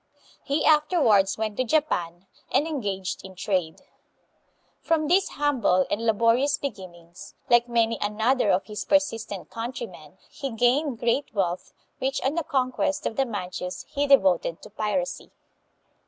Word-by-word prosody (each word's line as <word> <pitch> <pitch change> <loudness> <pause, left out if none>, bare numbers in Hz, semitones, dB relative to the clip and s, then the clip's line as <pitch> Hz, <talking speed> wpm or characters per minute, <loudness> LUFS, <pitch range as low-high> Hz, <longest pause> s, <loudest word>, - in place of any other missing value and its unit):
He 280 +2 0
afterwards 300 - +4
went 215 -1 -3
to 255 - +2
Japan, 195 - -1 0.3
and 295 - +3
engaged 200 - -3
hi 190 -1 -11
trade. 185 -4 -1 1.0
From 320 -2 +1
these 365 +5 +3
humble 255 -11 +2
and 225 - -1
laborious 230 +6 +3
beginnings, 185 -7 -9 0.2
like 240 0 +5
many 230 -1 +1
another 220 +3 +1
of 180 - +2
his 210 -2 -5
persistent 225 -8 -1
country 240 - -4
men, - - -15
he 275 - -6
gained 245 +3 +2
great 235 +5 0
wealth, 180 -3 -1 0.3
which 265 +1 -1
on 270 - +1
the 335 0 -1
conquest 265 +1 -1
of - - -2
the 270 -1 +1
Manchus 180 -4 -5
he 285 -1 -1
devoted 190 -10 +3
to - - -12
piracy. 260 +6 -2
230 Hz, 140 wpm, -25 LUFS, 195-280 Hz, 1.0 s, like